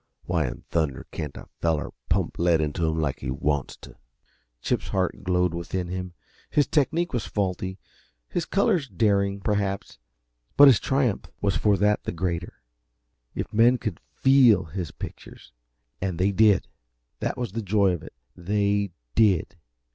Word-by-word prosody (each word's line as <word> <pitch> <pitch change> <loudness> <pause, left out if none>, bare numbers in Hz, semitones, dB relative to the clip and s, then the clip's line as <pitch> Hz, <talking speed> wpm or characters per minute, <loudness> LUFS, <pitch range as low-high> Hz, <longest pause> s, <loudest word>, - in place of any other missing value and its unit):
Why - - 0
in - - -7
thunder 80 -6 -1
can't 75 -5 -5
a - - -10
feller 80 -3 0 0.2
pump 95 -1 0
lead 85 -1 +3
into 80 +2 -1
'em 80 0 -1
like 75 -4 -1
he - - -5
wants 70 -3 -1
t'?" - - -13 0.7
Chip's - - -1
heart 95 -2 -1
glowed 90 -1 +1
within 85 +1 -3
him. 90 -1 -5 0.3
His 145 - +3
technique 160 +5 0
was 120 -5 -2
faulty, 95 -1 -2 0.5
his 175 - -2
colors 195 - +1
daring, 100 -2 +1
perhaps 100 - -2 0.6
but 145 - +10
his 130 -5 +7
triumph 130 -6 0
was 100 -2 0
for 105 -2 +3
that 105 +2 +2
the - - -3
greater. 85 0 -4 0.7
If - - -4
men 120 +4 +5
could 110 -9 -4 0.2
FEEL 125 -8 +5
his 90 -5 -3
pictures - - -10 0.5
and 95 -3 -2
they 95 +3 +2
did! 105 0 +4 0.5
That - - -2
was 120 -5 -3
the 115 +3 -3
joy 100 -1 +2
of 90 - -3
it - - -11 0.2
they 100 +1 0 0.2
did! 100 -5 +3
95 Hz, 155 wpm, -25 LUFS, 85-110 Hz, 0.7 s, but